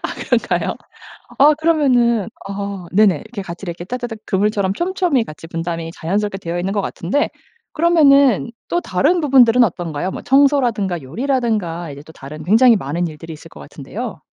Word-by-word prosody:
아 - - -4
그런가요? - - -1 0.6
아 295 +2 +6
그러면은 255 - +2 0.2
아 200 -2 -5
네네 200 -4 +4
이렇게 220 +3 -8
같이 175 +1 -8
이렇게 175 0 -6
따다닥 240 +1 -5
그물처럼 200 -1 0
촘촘히 345 - 0
같이 155 -1 -11
분담이 165 0 -4
자연스럽게 195 +4 -2
되어있는 175 +2 -3
것 205 - 0
같은데 195 +9 -1 0.4
그러면은 280 - +4 0.2
또 345 - 0
다른 300 - +1
부분들은 250 -4 +5
어떤가요? 175 -3 -2
뭐 - - -7
청소라든가 245 - +2
요리라든가 200 - -2
이제 140 +1 -9
또 160 - -14
다른 150 +2 -10
굉장히 225 +6 +5
많은 170 +2 -2
일들이 160 +1 -9
있을 155 - -12
것 75 - -14
같은데요. 70 - -7
200 Hz, 395 characters per minute, -18 LUFS, 170-255 Hz, 0.6 s, 아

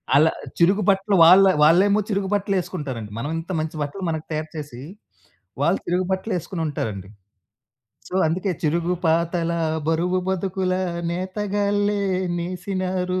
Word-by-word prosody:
అలా 155 +3 +5 0.3
చిరుగు 190 +5 +4
బట్టలు 195 +1 +2
వాళ్ళ 185 +4 +8 0.2
వాళ్ళేమో 195 +6 +5
చిరుగు 195 -1 -1
బట్టలేసుకుంటారండి. 175 - -2
మనవింత 165 +7 -4
మంచి 155 0 -4
బట్టలు 145 +7 -4
మనకి 160 -1 -3
తయారు 155 0 -3
చేసీ, 145 -5 -7 0.8
వాళ్ళు 170 +6 +2
చిరుగు 180 +1 0
బట్టలేసుకొనుంటారండి. 160 - -3 1.0
సో, - - -8
అందుకే 180 +5 -1
చిరుగు 170 +3 +1
పాతలా, 170 +1 +1 0.3
బరువు 175 +3 +1
బతుకుల 190 0 -1 0.4
నేతగాళ్ళే 205 +2 -1 0.4
నేసినారు, 185 +1 -2
180 Hz, 110 wpm, -23 LUFS, 160-195 Hz, 1.0 s, వాళ్ళ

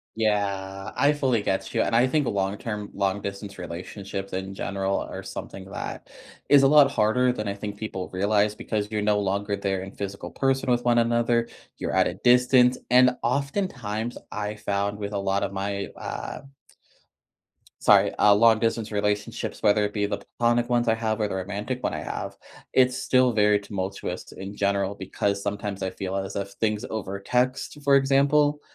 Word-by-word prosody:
Yeah, 100 -2 -1
I 145 +1 +4
fully 130 -7 +1
get 95 -1 -1
you, - - +3
and 115 - 0
I 120 +2 +5
think 145 +2 +1
long-term 100 +1 -2
long-distance 100 0 -3
relationships 95 +3 -6
in 95 +1 -4
general 100 0 -1
are - - -6
something 95 -1 -8
that 95 - -7 0.4
is 140 -1 +7
a 135 - +7
lot 145 -1 +7
harder 125 +1 +2
than 105 -4 -4
I 100 - -1
think 100 0 -6
people 100 -4 -5
realize, 105 +2 +1
because 105 -1 -3
you're 105 -1 -2
no 105 -1 +2
longer 100 +1 -1
there 95 -1 -2
in 95 - -8
physical 100 -4 -6
person 135 +3 0
with 120 0 +2
one 120 -1 +3
another, 120 0 +2 0.3
you're - - -3
at - - +4
a 90 - -4
distance, 125 +3 +4
and 125 0 +6
oftentimes, 125 - -2
I 105 0 -3
found 100 -1 -2
with 105 0 -5
a 100 - -1
lot 100 0 0
of 100 - -3
my, 100 +1 -3
ah, - - -5
um 135 - -16 1.3
sorry, - - +5
uh, 105 - +6
long-distance 115 0 +3
relationships, 105 +2 -2
whether 105 0 +4
it 105 - -4
be 105 -1 0
the 100 0 -2 0.2
platonic 120 0 +2
ones 120 -1 +1
I 110 - +4
have 110 -1 -1
or 105 - +1
the 100 - -4
romantic 105 +7 -4
one - - 0
I - - -3
have, - - -5 0.4
it's 130 0 +4
still 130 -1 +3
very 105 -1 +4
tumultuous 95 -2 -5
in 95 +2 -8
general 100 0 0
because 100 +1 -2
sometimes 100 -1 -3
I 95 - -2
feel 95 0 -4
as 95 0 -3
if 100 0 -3
things 105 0 -1
over 100 -3 -4
text, 125 +7 -1
for 140 -1 +5
example, 145 +2 +3
105 Hz, 180 wpm, -25 LUFS, 100-120 Hz, 1.3 s, is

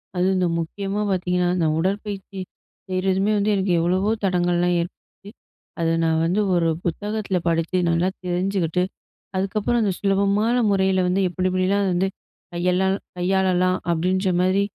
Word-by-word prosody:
அதுவும் 185 +1 +2
இந்த 180 -1 +2
முக்கியமா 195 +5 -3
பார்த்தீங்கன்னா, 180 -1 0
இந்த 165 - +2
உடற்பயிற்சி 195 +1 -3 0.5
செய்றதுமே 190 +2 +1
வந்து 205 +1 +1
எனக்கு 190 -2 +1
எவ்வளவோ 185 +5 +1
தடங்கல்லாம் 175 -1 +1
ஏற்படுது. 195 +3 -10 0.5
அத 165 0 +2
நான் 160 0 +2
வந்து 185 +5 +1
ஒரு 170 -1 +2 0.2
புத்தகத்தில 205 +2 -2
படிச்சு, 165 +2 0
நல்லா 170 +2 +2 0.2
தெரிஞ்சுக்கிட்டு, 180 -1 0 0.5
அதுக்கப்புறம் 215 +4 0
அந்த 195 -3 +1
சுலபமான 200 +3 +2 0.2
முறையில 190 -1 +2
வந்து 190 +2 +1
எப்பிடி 185 +1 -1
எப்பிடிலாம் 190 +2 +1
வந்து 185 +2 +1 0.4
கையெல் 180 +2 +1 0.4
கையாளலாம்? 185 0 +2
அப்பிடின்ற 185 +3 +1
மாதிரி 185 +2 +2
185 Hz, 130 wpm, -22 LUFS, 175-195 Hz, 0.5 s, அதுவும்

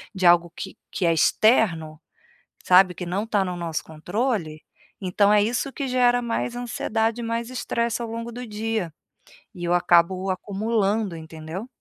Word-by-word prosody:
de 185 -1 -1
algo 175 0 +5
que - - -7
que 185 - -2
é 165 - +4
externo, 165 - +2 0.6
sabe, 185 0 +6
que 180 - -6
não 195 +5 -1
está 205 -3 +1
no 180 -1 -4
nosso 165 -2 -3
controle, 170 0 -2 0.4
então 200 +2 +2
é 210 -1 +5
isso 240 +5 -1
que 275 0 -4
gera 245 -1 +3
mais 240 +1 -2
ansiedade 230 -1 -1
e 235 - -4
mais 230 +1 -2
estresse 235 -2 -2
ao 230 - -4
longo 230 +1 -5
do 245 +2 -6
dia. 215 -5 -3 0.6
E 175 - -9
eu 175 0 +1
acabo 175 +2 +3
acumulando 205 0 -1
entendeu? 160 +6 -8
205 Hz, 165 wpm, -24 LUFS, 175-230 Hz, 0.6 s, sabe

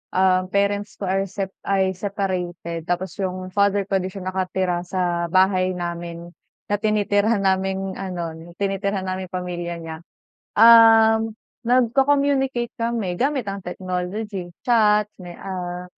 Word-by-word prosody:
ah, 185 0 +3
parents 200 +1 0
ko - - -9
ay 195 +1 0
sep 190 0 -4 0.2
ay 190 -1 +2
separated 180 -4 -4
tapos 180 +2 -3
yung 185 -1 -3
father 200 0 +2
ko 195 0 0
'di 185 - -3
siya 190 0 -8
nakatira 185 -1 -1
sa 175 -2 -1
bahay 185 0 +2
namin 170 -1 -5 0.4
na - - +4
tinitirhan 210 0 +1
naming 190 0 0
ano, 175 -4 -4 0.2
tinitirhan 200 0 -1
naming 185 0 -4
pamilya 175 -1 -4
niya. 165 -1 -7 0.6
Um, 225 -1 +7 0.3
nagko-communicate 265 0 +2
kami 230 -6 -1
gamit 270 -3 +1
ang 195 0 -4
technology. 185 +2 -4 0.2
Chat, 210 -3 +4 0.2
may 175 -1 -9
ah, 180 -2 -5
190 Hz, 130 wpm, -22 LUFS, 180-210 Hz, 0.6 s, Um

